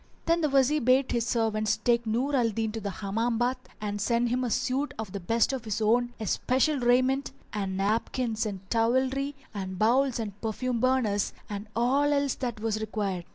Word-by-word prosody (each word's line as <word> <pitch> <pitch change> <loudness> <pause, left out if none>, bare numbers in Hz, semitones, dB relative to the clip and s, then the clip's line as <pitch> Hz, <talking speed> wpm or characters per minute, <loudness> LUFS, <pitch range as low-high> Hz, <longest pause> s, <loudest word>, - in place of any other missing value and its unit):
Then 335 +1 +2
the 305 - +2
Wazir 275 +2 +3
bade 255 +2 +3
his 235 -1 0
servants 215 -3 +1
take 235 +1 +1
Nur 255 +6 0
al 240 -3 +3
Din 220 0 -2
to 225 0 -5
the 200 - -3
Hammam 225 +4 -1
baths 250 +2 -1
and 205 -1 -3
sent 235 +2 +1
him 250 +2 0
a 245 - -1
suit 255 +5 -1
of 215 -3 -5
the 200 - -4
best 230 +8 +1
of 260 -4 -3
his 215 -2 -2
own 240 +3 +2
especial 260 - +1
raiment, 255 +3 +2 0.2
and 195 -2 -2
napkins 225 +3 0
and 195 -2 -7
towelry 260 +5 +1 0.2
and 190 -2 -5
bowls 250 +5 +3
and 205 -3 -5
perfume 235 +2 -2
burners 240 -5 +1 0.2
and 205 +1 -5
all 270 +5 +2
else 280 -2 +1
that 240 -4 -4
was 215 -1 -1
required. 200 -5 -3
235 Hz, 190 wpm, -28 LUFS, 215-255 Hz, 0.2 s, Wazir